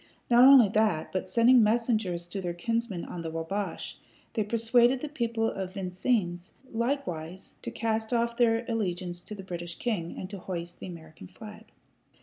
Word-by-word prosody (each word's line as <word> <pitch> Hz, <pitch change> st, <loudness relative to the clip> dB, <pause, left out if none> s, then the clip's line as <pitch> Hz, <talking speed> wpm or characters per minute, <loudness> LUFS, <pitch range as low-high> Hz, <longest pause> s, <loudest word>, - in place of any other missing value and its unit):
Not 240 Hz, +1 st, +7 dB
only 265 Hz, -5 st, +9 dB
that, 210 Hz, -6 st, +1 dB
but 185 Hz, 0 st, -2 dB
sending 235 Hz, +4 st, +6 dB
messengers 215 Hz, -6 st, +1 dB
to 195 Hz, +2 st, -4 dB
their 175 Hz, -2 st, -3 dB
kinsmen 230 Hz, -1 st, -2 dB
on 175 Hz, -, -6 dB
the 165 Hz, -, -4 dB
Wabash, 165 Hz, +3 st, -4 dB, 0.3 s
they 220 Hz, -, +1 dB
persuaded 235 Hz, +4 st, +3 dB
the 305 Hz, -, -4 dB
people 235 Hz, -6 st, -1 dB
of 190 Hz, -3 st, -4 dB
Vincennes 185 Hz, -1 st, -1 dB, 0.2 s
likewise 190 Hz, -, -3 dB
to -, -, -5 dB
cast 220 Hz, 0 st, -2 dB
off 235 Hz, -1 st, +1 dB
their 235 Hz, -1 st, +2 dB
allegiance 180 Hz, -6 st, -2 dB
to 210 Hz, -, -8 dB
the 195 Hz, -, -9 dB
British 175 Hz, -2 st, -6 dB
king, 190 Hz, -9 st, -3 dB
and 185 Hz, -, -5 dB
to 200 Hz, -, -6 dB
hoist 175 Hz, -1 st, -6 dB
the -, -, -7 dB
American 160 Hz, -, -11 dB
flag. -, -, -12 dB
205 Hz, 165 wpm, -28 LUFS, 175-235 Hz, 0.3 s, only